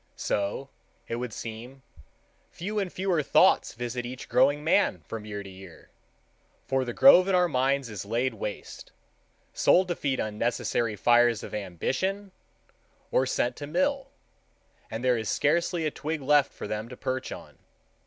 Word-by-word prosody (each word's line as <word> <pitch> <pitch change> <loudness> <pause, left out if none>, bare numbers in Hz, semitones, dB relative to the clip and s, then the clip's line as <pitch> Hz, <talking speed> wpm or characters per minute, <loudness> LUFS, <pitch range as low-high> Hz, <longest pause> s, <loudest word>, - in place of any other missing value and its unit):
So, 105 +7 -2 0.4
it 115 - -3
would 125 -1 -4
seem, 120 +5 -8 0.7
few 210 +5 -4
and 190 -3 -2
fewer 185 -4 0
thoughts 140 - +3
visit 120 +1 -4
each 125 +1 -7
growing 145 +1 +3
man 160 - +2
from 105 +7 -7
year 105 -1 -6
to 100 - -10
year, 95 -2 -14 0.7
for 135 -1 0
the 120 - -4
grove 185 - +7
in 195 - +2
our 180 -1 +4
minds 135 -2 +1
is 105 -4 -6
laid 120 +5 -1
waste,—sold 110 - -2
to 175 - 0
feed 135 -4 -2
unnecessary 110 +1 -1
fires 120 +1 +3
of - - -8
ambition, 135 - -3 0.8
or 130 - +2
sent 120 0 0
to 145 - -6
mill, 275 - 0 0.8
and 110 +2 -5
there 125 -2 +2
is 110 - -4
scarcely 170 +2 +1
a 155 - 0
twig 155 +2 -4
left 145 0 +3
for - - -7
them 110 +2 -4
to 125 - -10
perch 130 0 -3
on. - - -10
130 Hz, 155 wpm, -27 LUFS, 110-160 Hz, 0.8 s, grove